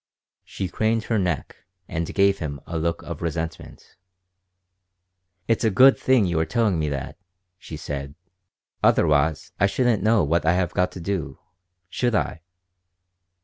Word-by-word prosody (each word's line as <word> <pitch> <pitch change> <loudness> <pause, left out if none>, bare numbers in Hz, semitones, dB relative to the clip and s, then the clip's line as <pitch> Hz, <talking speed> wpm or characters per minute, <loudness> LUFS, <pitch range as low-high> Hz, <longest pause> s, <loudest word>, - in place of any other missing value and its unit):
She 95 - -5
craned 110 +4 0
her 115 -2 0
neck 90 -7 -2 0.3
and 80 0 -3
gave 100 0 +3
him 70 -3 -4
a 80 - -4
look 85 +1 -2
of - - -7
resentment. 80 -1 -6 1.5
"It's 115 0 +1
a 110 - +4
good 130 +7 +6
thing 130 -5 +3
you 85 -3 0
are 80 - +1
telling 110 -8 +1
me 75 -1 0
that," 70 +3 -5 0.4
she 80 - -8
said. 70 -1 -6 0.7
"Otherwise 75 +2 +2
I 100 - +4
shouldn't 120 0 +1
know 110 0 +3
what 80 +2 +1
I 80 +2 +3
have 90 -2 0
got 90 - +1
to - - -8
do, 90 -1 -3 0.5
should 120 +6 -1
I?" 80 - -1
90 Hz, 150 wpm, -23 LUFS, 80-105 Hz, 1.5 s, good